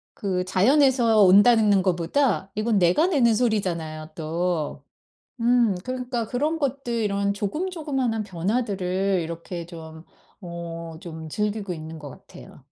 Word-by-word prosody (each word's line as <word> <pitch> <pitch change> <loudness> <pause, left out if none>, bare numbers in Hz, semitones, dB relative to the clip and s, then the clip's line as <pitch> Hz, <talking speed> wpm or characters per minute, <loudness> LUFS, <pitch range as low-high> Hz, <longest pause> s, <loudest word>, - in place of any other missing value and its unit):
그 185 -3 -2
자연에서 235 +2 +4
온다는 210 +3 +6
는 195 -2 +4
거보다 190 +4 0
이건 215 -1 +1
내가 180 - +3
내는 260 -10 +3
소리잖아요, 170 -9 -1
또. 160 -2 -2 0.6
음 235 -4 +3
그러니까 250 -2 -3
그런 300 +8 -1
것들 275 -4 -2
이런 200 -3 0
조금 300 - -3
조그만한 270 -9 -2
변화들을 195 -1 -1
이렇게 170 +1 -6
좀 160 -1 -11 0.4
어 170 -2 -7
좀 160 -2 -8
즐기고 210 +1 -2
있는 160 0 -8
것 145 -2 -9
같아요. 60 - -14
200 Hz, 285 characters per minute, -24 LUFS, 170-240 Hz, 0.6 s, 온다는